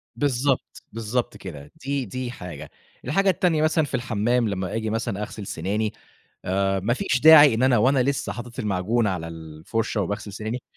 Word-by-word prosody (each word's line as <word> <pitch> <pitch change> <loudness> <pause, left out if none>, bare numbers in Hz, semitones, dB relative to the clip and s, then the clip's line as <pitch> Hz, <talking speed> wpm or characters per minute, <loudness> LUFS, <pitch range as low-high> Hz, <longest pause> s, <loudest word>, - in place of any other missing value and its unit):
بالضبط، 135 -1 -1
بالضبط 115 +2 -2
كده، 75 -6 -9
دي 140 -2 -1
دي 125 +3 -5
حاجة، 90 -7 -8 0.4
الحاجة 195 +10 +2
التانية 170 -3 +2
مثلًا 155 0 +2
في - - -11
الحمّام 120 0 0
لمّا 95 -2 -3
آجي 110 -1 -2
مثلًا 110 -2 -2
أغسل 105 -1 -6
سناني 105 +6 -2 0.5
آآ، 95 +1 +1
ما 105 +5 0
فيش 125 0 0
داعي 150 -2 +9
إن 115 +3 0
أنا 130 -3 +4
وأنا 130 +3 +3
لسه 140 +1 -1
حاطت 120 0 -8
المعجون 105 +3 0
على 90 -4 -3
الفُرشة 80 +8 -3
وباغسل 105 +1 -4
سناني، 110 +4 -5
115 Hz, 165 wpm, -24 LUFS, 100-130 Hz, 0.5 s, داعي